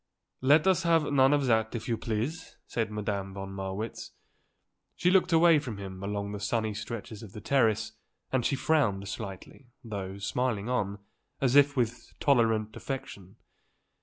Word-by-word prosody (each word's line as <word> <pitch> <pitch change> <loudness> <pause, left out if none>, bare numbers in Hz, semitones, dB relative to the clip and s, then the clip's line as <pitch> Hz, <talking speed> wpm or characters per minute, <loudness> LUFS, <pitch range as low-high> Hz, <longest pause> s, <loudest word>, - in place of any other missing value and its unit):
"Let 145 +4 +5
us 190 -1 +4
have 165 -4 +2
none 135 0 +5
of 145 -2 +2
that, 110 -2 +2
if 115 - -5
you 115 - +1
please," 115 +9 -4
said 115 -2 -2
Madame 100 -2 -3
von 95 0 -6
Marwitz. 95 +3 -5 0.8
She 180 - +2
looked 185 -1 +4
away 165 -1 +6
from 120 -7 -6
him 95 -1 -7
along 100 0 -3
the 105 - -5
sunny 110 +2 -1
stretches 105 0 -6
of 105 -3 -11
the - - -7
terrace 110 -2 +2 0.4
and 130 -2 +1
she 140 - +1
frowned 120 -10 +1
slightly, 105 +4 -7 0.2
though 100 -4 -5
smiling 110 +1 -1
on, 100 -5 -1 0.4
as 130 -1 +2
if 145 0 +5
with 120 0 -2
tolerant 115 -6 +2
affection. 130 -9 -6
110 Hz, 160 wpm, -29 LUFS, 100-135 Hz, 0.8 s, away